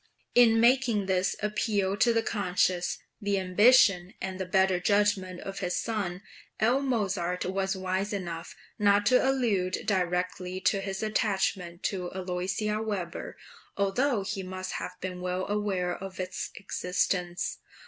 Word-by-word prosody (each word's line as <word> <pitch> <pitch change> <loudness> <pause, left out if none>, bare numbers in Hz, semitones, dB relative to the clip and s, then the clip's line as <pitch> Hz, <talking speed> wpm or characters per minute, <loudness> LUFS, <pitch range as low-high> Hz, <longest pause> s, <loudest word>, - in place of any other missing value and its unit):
In 230 -2 +6
making 235 -3 +3
this 185 -1 +1
appeal 205 -2 0
to 235 +4 +4
the 225 -1 +1
conscience, 185 -4 0 0.2
the 200 -1 0
ambition, 195 0 +4
and 190 -1 -5
the 190 - -3
better 190 -1 +3
judgment 200 -2 +1
of 195 0 -6
his 180 - -1
son, 200 -5 -3 0.4
L. 245 +5 +3
Mozart 195 -9 -1
was 195 +1 -1
wise 190 +2 -2
enough 175 -4 -5 0.2
not 205 0 +4
to 250 +3 +5
allude 225 -9 +1
directly 180 -1 -1
to 195 +1 +2
his 195 +1 -4
attachment 190 -5 -1
to 180 -3 -2
Aloysia 190 +4 -2
Weber, 195 -6 -4 0.4
although 205 +3 +1
he 195 0 -3
must 185 0 -5
have - - -5
been 180 -1 -5
well 180 +1 -2
aware 195 -4 -1
of 190 -1 -8
its 185 0 -4
existence. 180 -2 -1
195 Hz, 140 wpm, -28 LUFS, 180-210 Hz, 0.4 s, In